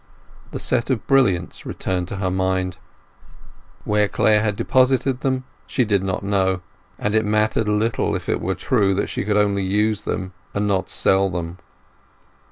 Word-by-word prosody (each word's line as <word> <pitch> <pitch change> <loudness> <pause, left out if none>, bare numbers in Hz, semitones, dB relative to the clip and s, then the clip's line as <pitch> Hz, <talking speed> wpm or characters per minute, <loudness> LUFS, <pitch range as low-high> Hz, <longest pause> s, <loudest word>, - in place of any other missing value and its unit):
The - - -5
set 125 -1 0
of 130 -5 -1
brilliants 100 -11 +2
returned 90 -2 -3
to 100 - -5
her 95 -1 -1
mind. 95 -1 -1 1.1
Where 105 0 +2
Clare 105 +1 +3
had 105 -2 0
deposited 130 +3 +2
them 130 -1 0 0.2
she 125 - +1
did 100 -3 +2
not 95 0 -2
know, 95 -2 +1 0.4
and 105 - -1
it 110 0 +3
mattered 105 +1 +1
little, 105 +2 0
if - - -5
it - - 0
were - - -1
true 95 -1 +1
that 100 - -1
she - - -2
could 105 +1 +1
only 100 -1 +2
use 105 +2 0
and 95 0 -2 0.2
not 100 -2 0
sell 95 0 +3
them. 85 0 -5
105 Hz, 165 wpm, -21 LUFS, 95-110 Hz, 1.1 s, Clare